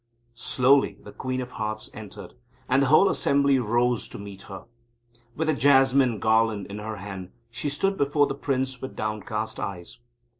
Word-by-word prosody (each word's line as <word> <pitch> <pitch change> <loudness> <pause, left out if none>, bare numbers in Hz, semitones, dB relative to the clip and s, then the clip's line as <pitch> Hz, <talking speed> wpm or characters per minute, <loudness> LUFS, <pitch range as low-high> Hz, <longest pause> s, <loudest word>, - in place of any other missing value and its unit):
Slowly 125 -1 +2
the 105 - -10
Queen 130 +3 -3
of 125 0 -7
Hearts 110 -2 -4
entered, 105 -2 -10 0.3
and 130 +2 +3
the 135 - +3
whole 155 +8 +6
assembly 140 -5 +2
rose 120 +1 +1
to - - -9
greet 100 -1 -9
her. 95 -1 -8 0.7
With 160 +1 -1
a 155 - +3
jasmine 135 -2 +4
garland 110 -2 +2
in 105 - -6
her 110 +1 -5
hand, 95 -2 -7 0.2
she 120 +6 -2
stood 195 +7 0
before 145 +1 +3
the 140 - -3
Prince 130 -2 -2
with 130 - -7
downcast 110 +1 -3
eyes. 90 -1 -6
120 Hz, 165 wpm, -25 LUFS, 105-135 Hz, 0.7 s, whole